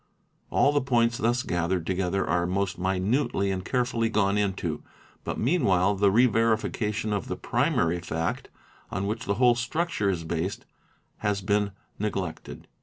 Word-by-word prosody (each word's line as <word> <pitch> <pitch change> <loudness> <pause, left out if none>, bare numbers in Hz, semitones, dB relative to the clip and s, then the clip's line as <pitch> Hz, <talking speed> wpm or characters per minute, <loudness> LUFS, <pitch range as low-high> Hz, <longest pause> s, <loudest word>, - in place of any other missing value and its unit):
All 140 - +3
the 145 0 +2
points 120 -3 +2
thus 120 +2 +1
gathered 85 0 -1
together 95 +1 0
are 85 +1 +1
most 95 +1 -1
minutely 95 +3 0
and 95 -1 -3
carefully 120 -1 0
gone 100 -2 +2
into, 95 -6 -1 0.4
but - - -3
meanwhile 105 - +2
the 100 0 +3
re 115 +6 +5
verification 110 -2 0
of 100 - -2
the - - -3
primary 85 +2 +1
fact 85 -1 -3 0.4
on 95 - -2
which 105 +2 -3
the 100 - 0
whole 125 +1 +5
structure 120 - -1
is 85 -4 -1
based 85 +3 -3 0.5
has 105 -2 -1
been 100 0 0 0.3
neg 105 -1 -1
lected. 90 -4 -6
100 Hz, 155 wpm, -27 LUFS, 95-115 Hz, 0.5 s, re